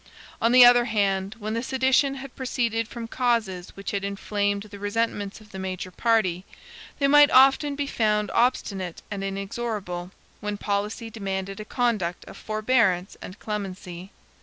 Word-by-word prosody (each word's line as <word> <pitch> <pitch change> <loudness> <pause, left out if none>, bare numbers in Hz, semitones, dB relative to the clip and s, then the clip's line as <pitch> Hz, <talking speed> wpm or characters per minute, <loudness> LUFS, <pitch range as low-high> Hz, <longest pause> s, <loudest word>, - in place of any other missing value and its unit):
On 230 - +3
the 250 0 +9
other 245 0 +6
hand, 200 -3 0
when 215 -1 -4
the 230 - -1
sedition 265 +2 +2
had 270 -1 -9
proceeded 235 -3 -1
from 235 -1 -7
causes 225 -8 -1
which 195 - -5
had 200 -1 -2
inflamed 200 0 -1
the 205 -1 -11
resentments 205 -1 -2
of 215 -1 -18
the 190 - -7
major 185 -1 -5
party, 190 -5 +1 0.5
they 280 - +2
might 290 +1 +7
often 270 +2 +5
be 285 0 -2
found 210 -5 0
obstinate 195 -8 0
and 200 -1 -4
inexorable, 195 -2 -4 0.3
when 210 0 -4
policy 210 +3 -3
demanded 195 -2 -4
a 215 - -6
conduct 215 -9 -1
of - - -11
forbearance 215 -4 +1
and 185 - -9
clemency. 190 -3 -6
210 Hz, 155 wpm, -25 LUFS, 195-240 Hz, 0.5 s, the